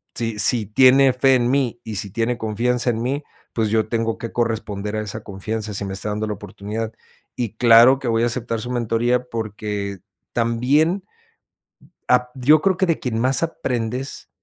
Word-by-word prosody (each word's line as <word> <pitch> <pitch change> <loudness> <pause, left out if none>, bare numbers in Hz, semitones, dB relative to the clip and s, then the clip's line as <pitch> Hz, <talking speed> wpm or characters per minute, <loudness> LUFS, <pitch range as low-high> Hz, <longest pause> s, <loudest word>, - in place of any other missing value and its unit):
si 115 -2 -2
si 115 0 +6
tiene 130 +4 +5
fe 135 +1 +3
en 120 -1 +1
mí 130 -4 0
y 110 - -6
si 100 +1 -3
tiene 115 +3 -1
confianza 120 +3 -1
en 115 -1 -3
mí, 135 +4 -2 0.3
pues 115 -2 0
yo 110 0 +1
tengo 115 -1 -1
que 115 - -6
corresponder 110 -3 -2
a 110 - -1
esa 110 +1 -6
confianza 105 +2 -5
si 100 - -2
me 95 - -5
está 100 +2 -3
dando 105 +1 -2
la 105 - -2
oportunidad". 105 +2 -6 0.4
Y 115 -3 -4
claro 120 +3 +6
que 130 - -5
voy 115 0 +1
a - - +3
aceptar 120 -1 -2
su 125 - -5
mentoría 120 +1 0
porque, 105 -3 -4 0.3
también. 135 +11 +1 1.1
Ap 125 0 +3
yo 140 +4 +4
creo 190 +2 +1
que 190 - +1
de 165 -2 0
quien 115 -3 -3
más 130 +3 +2
aprendes, 130 -5 -3
115 Hz, 185 wpm, -21 LUFS, 110-125 Hz, 1.1 s, si